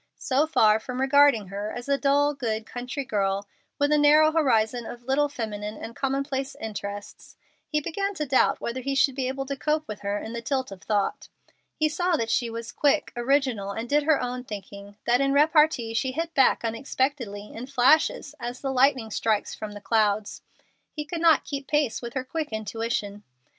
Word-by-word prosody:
So 285 +2 +1
far 215 -7 +4
from 250 +3 -6
regarding 270 -6 +4
her 205 +2 -4
as 245 +1 -7
a 280 - +3
dull, 285 +1 +2
good, 225 -5 -3
country 250 +4 -5
girl 200 -4 -1 0.3
with 285 +1 +1
a 300 - +4
narrow 305 +1 +6
horizon 240 -7 +1
of 240 0 -9
little 275 +3 +1
feminine 215 -5 -5
and 230 - -8
commonplace 275 0 -2
interests, 205 -2 -7 0.3
he 300 - 0
began 395 +6 -2
to 305 - -2
doubt 260 -1 +2
whether 245 +2 -4
he 275 +2 -2
should 270 0 +3
be 260 -1 -2
able 270 +1 -3
to 280 +1 -3
cope 305 +2 -1
with 210 - -6
her 200 0 -2
in 220 +2 -6
the 235 - -4
tilt 260 -1 -2
of 190 -1 -10
thought. 205 -2 -1 0.5
He 310 - +2
saw 350 +2 0
that 230 0 -2
she 240 - +1
was 230 0 -6
quick, 295 +1 +1
original, 240 -5 +1
and 225 +3 -4
did 295 +4 +3
her 300 0 +3
own 250 0 -3
thinking, 200 -2 -9
that 245 +2 +3
in 275 0 +2
repartee 300 -5 +3
she 255 +3 -1
hit 330 +3 -3
back 265 -4 +3
unexpectedly, 230 -3 -2
in 240 +3 -7
flashes, 280 +2 +3
as 240 +1 -5
the 270 -1 -3
lightning 255 -3 +3
strikes 215 0 0
from 215 -1 -7
the 205 - -8
clouds. 210 -1 0 0.5
He 300 -1 -4
could 330 +1 -5
not 325 -3 +5
keep 275 -1 -5
pace 295 -6 +1
with 235 +1 -7
her 260 - -1
quick 310 +3 -4
intuition. 220 -1 -3
255 Hz, 195 wpm, -26 LUFS, 220-285 Hz, 0.5 s, narrow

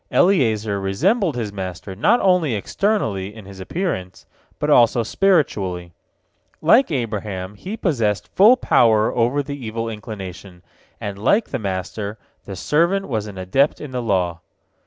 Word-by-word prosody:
Eliezer 110 - +2
resembled 160 - +1
his 110 -4 -4
master 95 0 -6
not 210 - +3
only 180 - +2
externally, 105 - -1
in 110 -3 -11
his 95 -1 -11
appearance, 95 - -4 0.3
but - - -2
also 120 0 +4
spiritually. 100 - 0 0.7
Like 230 - +4
Abraham 105 - -3
he 190 - -7
possessed 115 - 0
full 220 +7 +6
power 110 - +3
over 125 +5 +1
the 140 -1 -7
evil 115 +1 -3
inclination, 95 -4 -8 0.4
and 100 -1 -5
like 205 - +2
the 130 - -3
master, 100 +1 -4 0.3
the 100 - -7
servant 170 - +1
was 110 -4 -2
an 100 -2 -9
adept 95 +11 +1
in 150 - -8
the 125 -1 -3
law. 90 -7 -1
110 Hz, 140 wpm, -21 LUFS, 95-155 Hz, 0.7 s, full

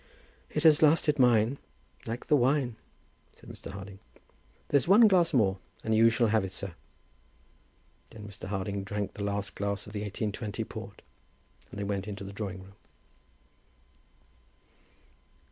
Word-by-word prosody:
"It 150 - -2
has 160 0 +6
lasted 150 -1 +4
mine, 120 +1 +4 0.5
like 115 +2 -4
the 150 - +4
wine," 130 -2 +2 0.6
said - - -17
Mr. - - -10
Harding. 100 0 -9 0.7
"There's 140 0 +2
one 215 +5 +8
glass 180 -4 +4
more, 100 -9 +2 0.2
and 110 - 0
you 115 +1 +6
shall 115 0 +2
have 110 -1 +2
it, 95 - -5
sir." 95 -2 -6 1.4
Then 105 -2 -11
Mr. 100 -2 -9
Harding 100 0 -3
drank 100 +1 -4
the 105 - -6
last 100 0 -2
glass 100 0 -3
of 105 - -11
the 105 - -3
1820 105 +1 -3
port, - - -9 0.7
and - - -8
they - - -2
went 100 -1 -3
into 100 -1 -6
the 100 +1 -8
drawing 95 -3 -5
room. 95 +1 -16
105 Hz, 145 wpm, -29 LUFS, 100-125 Hz, 1.4 s, one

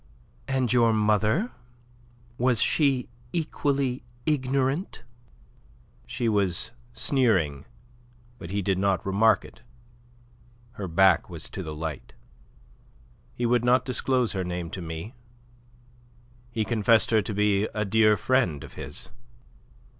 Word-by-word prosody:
"And 130 -3 0
your 115 -2 +4
mother, 110 - +2 0.9
was 125 -2 +2
she 135 -5 +2 0.3
equally 140 -5 -1 0.2
ignorant?" 135 +3 -1 1.0
She 120 - -2
was 100 -3 0 0.2
sneering, 100 - +1 0.7
but 85 - -8
he 100 +1 -2
did 95 0 0
not 100 -1 +1
remark 100 +2 +3
it. - - -15 1.1
Her 105 -5 -6
back 90 0 +3
was - - -7
to - - -5
the 75 -1 -6
light. 80 -3 -6 1.2
"He 120 - -2
would 120 0 +2
not 125 +1 +3
disclose 125 -1 0
her 95 -1 -2
name 90 -1 -4
to 95 - -6
me. 80 +7 -6 1.4
He 115 -2 -2
confessed 110 0 +3
her 110 -1 +4
to 105 +2 -5
be 105 0 +2
a 105 -1 -3
dear 110 +1 +4
friend 95 - +1
of - - -11
his." - - -8
110 Hz, 120 wpm, -26 LUFS, 95-125 Hz, 1.4 s, your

